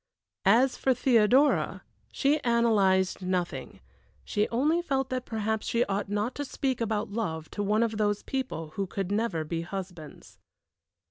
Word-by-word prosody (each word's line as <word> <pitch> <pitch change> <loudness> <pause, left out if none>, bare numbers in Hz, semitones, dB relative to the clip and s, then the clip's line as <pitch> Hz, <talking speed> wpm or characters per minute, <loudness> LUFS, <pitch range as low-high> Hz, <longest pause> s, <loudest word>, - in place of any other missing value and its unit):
As 245 +6 +4
for 260 -1 +2
Theodora, 250 +3 +3 0.3
she 290 +3 +2
analyzed 205 -7 +2
nothing, 180 -1 -3 0.4
she 210 -1 0
only 300 +9 +2
felt 270 -5 -1
that 255 -1 -3
perhaps 220 -1 -2
she 235 +1 +2
ought 200 0 -2
not 210 +4 -1
to 290 - -2
speak 265 -2 -2
about 215 -2 -1
love 160 -8 -3
to 205 - -4
one 210 +3 +2
of 220 -2 -1
those 205 -1 0
people 255 - -4
who 195 +4 -3
could 195 0 -4
never 205 -6 0
be 165 +2 -3
husbands. 175 -4 -8
215 Hz, 150 wpm, -28 LUFS, 195-250 Hz, 0.4 s, As